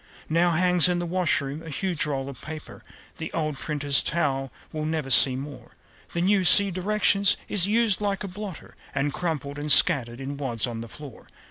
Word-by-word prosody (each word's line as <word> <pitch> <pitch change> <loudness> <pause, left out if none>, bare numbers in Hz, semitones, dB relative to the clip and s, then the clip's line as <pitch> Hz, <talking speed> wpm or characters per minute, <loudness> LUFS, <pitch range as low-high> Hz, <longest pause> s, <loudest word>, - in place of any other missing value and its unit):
Now 170 +2 +3
hangs 180 +1 +3
in 180 - 0
the 175 - -2
washroom 155 -5 -1
a 165 - -9
huge 170 +1 -2
roll 135 -2 -3
of 140 -3 -7
paper 155 -1 -8 0.4
The 160 - -6
old 155 -3 -2
printer's 145 -1 +1
towel 135 -5 -1 0.2
we'll 155 -1 -4
never 155 -4 -3
see 130 -1 +6
more. 140 +2 -9 0.4
The 170 - -1
new 195 +1 +2
(see 200 +2 +6
directions) 200 +1 +1
is 195 -3 +2
"used 215 -2 +1
like 200 -1 -2
a - - -4
blotter," 195 -1 -8 0.2
And 140 +1 -1
crumpled 145 -5 -4
and 150 0 -1
scattered 130 -7 +4
in 140 +1 -6
wads 120 -6 -2
on 115 -2 -6
the 115 - -8
floor. 145 -3 -12
155 Hz, 190 wpm, -25 LUFS, 140-180 Hz, 0.4 s, see